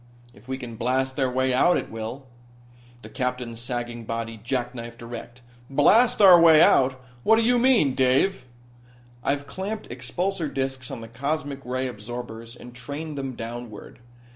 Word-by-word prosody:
"If 105 +5 -19
we 130 0 -3
can 120 -3 -8
blast 130 +3 -1
our 130 -1 +2
way 130 0 +1
out, 175 +8 +4
it - - -5
will." 115 +5 -6 0.8
The - - -10
Captain's 125 -3 -3
sagging 120 -1 -4
body 115 0 -4
jackknifed 120 -1 -4
erect. 120 +1 -9 0.3
"Blast 210 - +4
our 180 -3 +9
way 160 -2 +8
out? 130 -3 +4 0.2
What 220 - +5
do 225 - +2
you 245 +1 +3
mean, 235 - +4
Dave?" 130 +3 +2 0.8
"I've 140 0 -1
clamped 195 +10 -5
expulsor 160 +7 -3
disks 130 -1 -3
on 115 - -6
the 115 - -8
cosmic 140 +3 -3
ray 130 +1 -2
absorbers 115 0 -7
and 120 0 -12
trained 145 +5 -6
them 135 -2 -4
downward. 115 -1 -8
130 Hz, 155 wpm, -25 LUFS, 120-145 Hz, 0.8 s, our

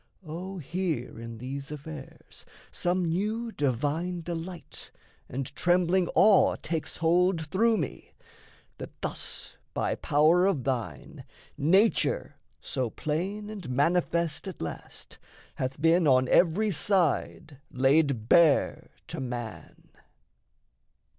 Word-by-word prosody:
O, 180 +5 -6
here 165 -7 -3
in 115 0 -8
these 135 +4 -6
affairs 150 -1 -10 0.3
Some 180 0 0
new 215 +7 -1
divine 150 - -1
delight 170 +1 -7 0.4
and 135 +1 -5
trembling 180 0 +2
awe 210 -3 +5
Takes 160 -1 -3
hold 170 0 +2
through 220 +8 +2
me, 155 -8 -5 0.6
that - - -9
thus - - -3 0.2
by - - 0
power 160 +6 +3
of 165 -10 0
thine 125 -3 -4 0.3
Nature, 190 +10 +2 0.3
so 130 -4 -2
plain 180 - -3
and 195 -10 -7
manifest 170 +5 0
at 190 - -7
last, 80 - -8 0.3
Hath 130 +1 -4
been 165 +1 +4
on 130 -1 +4
every 195 +5 +3
side 165 -5 0
laid 135 -3 +2
bare 160 -1 +4 0.2
to - - -5
man! 120 -3 -7
165 Hz, 110 wpm, -28 LUFS, 135-180 Hz, 0.6 s, awe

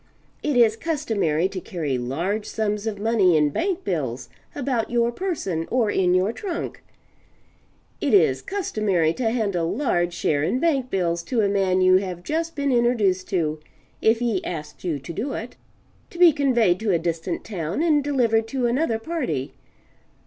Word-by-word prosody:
It 295 -4 0
is 225 -2 +5
customary 225 - 0
to 190 -2 -6
carry 155 -8 -3
large 170 - -2
sums 210 0 -2
of 215 -2 -2
money 200 -5 +3
in 150 -1 +2
bank 375 - -1
bills 130 -8 -3 0.3
about 255 -5 -1
your 235 0 +1
person 235 - -3
or 235 -4 +1
in 180 -1 +2
your 190 +5 +2
trunk. 360 - -5 1.2
It - - 0
is 395 - +4
customary 210 - 0
to 235 +2 -1
hand 220 -5 -1
a 175 - +1
large 175 - 0
sum - - +1
in 245 +11 0
bank 275 -5 +1
bills 170 -4 0
to 245 -4 0
a 205 - +2
man 190 -2 +1
you 185 0 +6
have 185 -2 -4
just 330 - -2
been 280 -1 0
introduced 225 -7 +2
to 160 -6 -1 0.4
(if 220 +1 +4
he 230 -5 -1
asks 155 -3 -6
you 170 -5 -1
to 140 +5 -8
do 255 - -3
it,) 235 +2 -6 0.5
to - - -12
be 345 -3 +7
conveyed 240 - +2
to 220 -1 -2
a 175 - +3
distant 165 +1 -3
town 185 - -3
and 305 -4 +3
delivered 235 -6 +1
to 255 +1 -1
another 240 0 +1
party. 245 - -3
215 Hz, 170 wpm, -23 LUFS, 175-255 Hz, 1.2 s, be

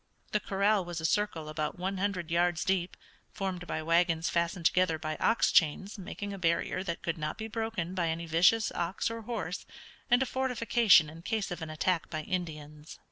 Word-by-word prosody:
The 210 - +2
corral 200 0 +1
was 175 -1 -5
a 160 - -3
circle 170 -3 0
about 155 +1 -3
one 190 +1 -3
hundred 185 -4 -2
yards 170 -1 +2
deep, 190 -2 0 0.3
formed 185 -2 -4
by 155 - -3
wagons 165 0 +2
fastened 170 0 -1
together 180 -2 +3
by 155 0 -4
ox 230 - +3
chains, 190 +6 +2
making 200 +1 -6
a 195 - -7
barrier 170 +1 0
that 170 -3 -4
could 165 -1 -2
not 150 0 -3
be 220 - -5
broken 220 -6 -3
by 175 -3 0
any 165 +1 -3
vicious 180 +7 +4
ox 175 +6 -2
or 230 0 -5
horse, 230 +1 -4 0.5
and 245 +2 +5
a - - -2
fortification 235 -9 +4
in 160 +2 -11
case 215 +1 -2
of 175 - -5
an 160 - -5
attack 165 +2 0
by 155 -2 -4
Indians. 150 -4 -5
175 Hz, 190 wpm, -30 LUFS, 165-205 Hz, 0.5 s, and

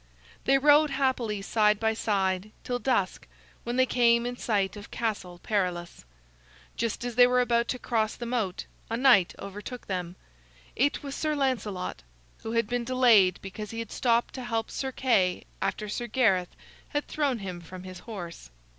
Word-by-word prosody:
They 275 +1 +5
rode 295 +2 +5
happily 255 -7 0
side 210 0 +3
by 220 0 +2
side 195 -2 0
till 245 0 -2
dusk, 200 - 0 0.4
when 240 - -3
they 260 0 +4
came 235 -1 +3
in 245 0 -3
sight 205 -6 0
of 205 -1 -10
Castle 200 -6 -3
Perilous. 175 - -2 0.7
Just 230 +1 -2
as 245 - -3
they 245 +1 +7
were 250 0 +3
about 235 -1 +2
to 255 - -2
cross 220 -3 -1
the 240 - -6
moat, 230 -6 -2 0.2
a 230 - -1
knight 245 -9 +5
overtook 205 +5 -8
them. 180 -2 -4 0.6
It 285 +3 +1
was 280 -1 -5
Sir 305 +1 -1
Lancelot, 230 -9 -2 0.4
who 225 - -5
had 230 -1 +2
been 245 +2 -2
delayed 235 -7 +5
because 205 +2 -7
he 225 - -7
had 230 -2 -5
stopped 235 -1 +1
to 260 - -6
help 225 -2 -2
Sir 265 -1 -3
Kay 215 -9 +2 0.2
after 210 - -2
Sir 240 +3 -3
Gareth 200 -7 +2 0.3
had 290 0 -2
thrown 285 -5 0
him 185 -4 -6
from 180 +2 -10
his 185 -1 -9
horse. 175 - -8
225 Hz, 170 wpm, -28 LUFS, 195-250 Hz, 0.7 s, they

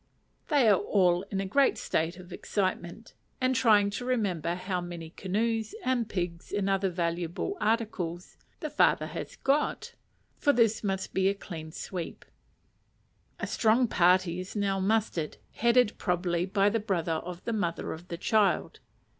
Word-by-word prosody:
They 285 -7 +4
are 205 -3 +5
all 180 -4 +2
in 195 - -2
a 195 - -1
great 275 +8 +3
state 165 +2 -1
of 180 -1 -11
excitement, 185 +1 -3 0.3
and 255 0 +1
trying 210 -4 +4
to 210 - -4
remember 195 -10 0
how 185 0 -3
many 170 -2 -7
canoes, 220 - -1
and 245 -4 +1
pigs, 175 -3 -4
and 205 -1 0
other 195 0 +1
valuable 170 - -2
articles, 210 -6 -1 0.3
the 305 - -4
father 295 - +3
has - - -6
got: 280 +2 0 0.5
for 285 - +4
this 225 -3 +2
must 195 -2 -2
be 190 0 +3
a 200 - -1
clean 160 -5 -8
sweep. 175 +1 -6 1.1
A - - -2
strong 230 +2 +3
party 180 -2 +3
is 185 +3 -7
now 200 -2 0
mustered, 195 -5 0
headed 235 -1 +3
probably 175 -1 0
by 195 +1 +2
the 225 +2 +2
brother 185 -6 -1
of 180 0 -8
the 230 - -1
mother 175 -6 -2
of 175 +3 -11
the 170 - -5
child. 210 +2 +1
195 Hz, 155 wpm, -29 LUFS, 175-220 Hz, 1.1 s, are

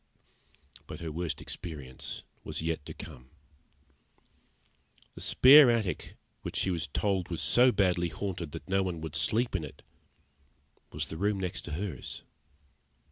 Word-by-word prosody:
But - - -7
her 80 -2 -4
worst 85 +1 -3
experience 70 -6 -6 0.2
was - - -4
yet 80 -2 -2
to - - -6
come. 65 +1 -10 1.8
The - - -10
spare 135 +1 +8
attic 110 -6 -1 0.3
which - - -6
she 95 - +1
was 85 -3 -1
told 95 +4 -1
was 85 -3 -3
so 120 - +5
badly 90 -5 +2
haunted 90 -3 -4
that - - -8
no 95 +1 +2
one 90 -3 -2
would 80 -2 -5
sleep 120 0 +1
in 85 - -1
it, 75 - -10 1.1
was - - -3
the 80 - -5
room 100 +2 0
next 90 -2 -3
to 80 - -6
hers. 85 -5 -5
90 Hz, 145 wpm, -30 LUFS, 80-100 Hz, 1.8 s, spare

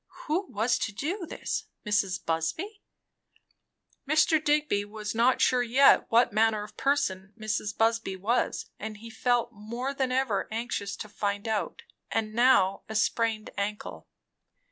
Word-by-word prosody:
Who 355 +6 -1
was 220 +4 +1
to 220 - -2
do 335 - -4
this? - - -4 0.2
Mrs. 195 -3 0
Busby? 315 - -2 1.3
Mr. 310 0 +4
Digby 295 -9 +2
was 210 +1 -6
not 235 +3 +3
sure 250 -1 +4
yet 255 +4 +5
what 230 -2 +4
manner 215 -1 +2
of 210 - -12
person 200 -9 -1
Mrs. 210 -1 -2
Busby 225 -3 +1
was; 215 +6 -1
and 215 0 -6
he 230 +2 -10
felt 240 +1 +1
more 235 +5 -5
than 265 -2 -1
ever 255 -6 0
anxious 220 -3 -3
to 215 - -7
find 205 0 -3
out. 220 -2 -2 0.3
And 215 -1 -1
now 225 -5 +4
a 220 - -5
sprained 220 0 0
ankle! 210 +1 -4
225 Hz, 145 wpm, -28 LUFS, 205-255 Hz, 1.3 s, yet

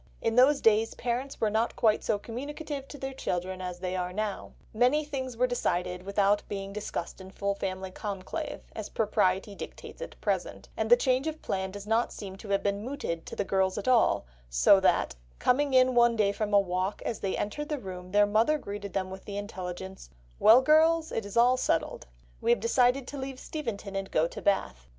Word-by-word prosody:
In 225 - 0
those 275 +3 +5
days 225 0 +3
parents 250 +3 -3
were 215 -2 +1
not 220 +2 0
quite 215 -2 +2
so 215 - +1
communicative 280 +5 -6
to 290 - -9
their 270 0 -5
children 185 -6 -3
as 180 -1 -5
they 185 0 -3
are 180 -1 -2
now; 210 +1 -4 0.2
many 250 +7 +3
things 260 -4 -5
were 250 - +3
decided 180 -7 -1
without 200 +1 +2
being 195 -1 -5
discussed 200 -3 -5
in 190 - -10
full 200 +1 -2
family 190 -1 -4
conclave, 205 - -5
as 215 -2 -5
propriety 200 -2 +1
dictates 200 - -9
at - - -8
present, - - -2
and - - -1
the 485 - +8
change 260 - +1
of 315 0 -5
plan 190 0 -2
does 200 +1 -8
not 225 +2 +1
seem 195 -3 -7
to 200 - -11
have 200 0 +1
been 200 0 -1
mooted 245 - -4
to - - -6
the - - 0
girls 190 -1 +1
at 205 - -4
all, 245 - +4 0.2
so - - +6
that, - - +2 0.2
"coming 280 +3 +2
in 255 0 +5
one 240 -1 +5
day 210 -3 +2
from 210 +1 -3
a 205 - +6
walk, 185 +1 -2
as 225 - -2
they 195 -2 -2
entered 295 +9 -3
the 300 - -1
room 185 -5 -8
their 205 +1 +5
mother 220 +9 +3
greeted 200 - -7
them 185 -1 -2
with 190 0 -9
the 200 -1 -5
intelligence: 190 - -6 0.3
'Well, 235 +4 +7
girls, 320 +2 +4
it 220 -3 -3
is 200 - -6
all 245 +2 +5
settled. - - -1 0.3
We - - -1
have 240 - +4
decided 250 +3 +2
to 285 - -6
leave 265 -1 -6
Steventon 215 -10 -5
and 195 0 -3
go 160 +1 +2
to - - -8
Bath. 65 - 0
210 Hz, 205 wpm, -29 LUFS, 190-255 Hz, 0.3 s, the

